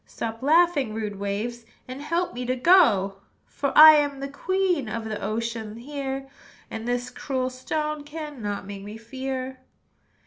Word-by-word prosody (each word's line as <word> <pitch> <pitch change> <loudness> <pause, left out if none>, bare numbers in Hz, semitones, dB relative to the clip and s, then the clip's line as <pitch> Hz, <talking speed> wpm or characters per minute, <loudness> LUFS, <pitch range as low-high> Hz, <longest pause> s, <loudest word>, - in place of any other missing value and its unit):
Stop 225 0 -5
laughing, 300 -5 +3
rude 210 -2 -4
waves, 215 +4 -3 0.2
And 255 +2 -7
help 335 +4 -1
me 245 +1 -4
to 255 - +1
go! 235 - +4 0.3
"For 280 -1 -3
I 310 +1 +12
am 285 -2 0
the 275 - -4
queen 360 - 0
Of 225 +1 -4
the 215 -1 -4
ocean 220 0 -3
here, 270 +2 -5 0.4
And 225 +1 -5
this 245 0 -2
cruel 260 -2 -2
stone 300 +4 -3
Cannot 290 -10 -5
make 200 0 -7
me 210 +2 -8
fear." 260 +2 -5
255 Hz, 150 wpm, -25 LUFS, 225-290 Hz, 0.4 s, I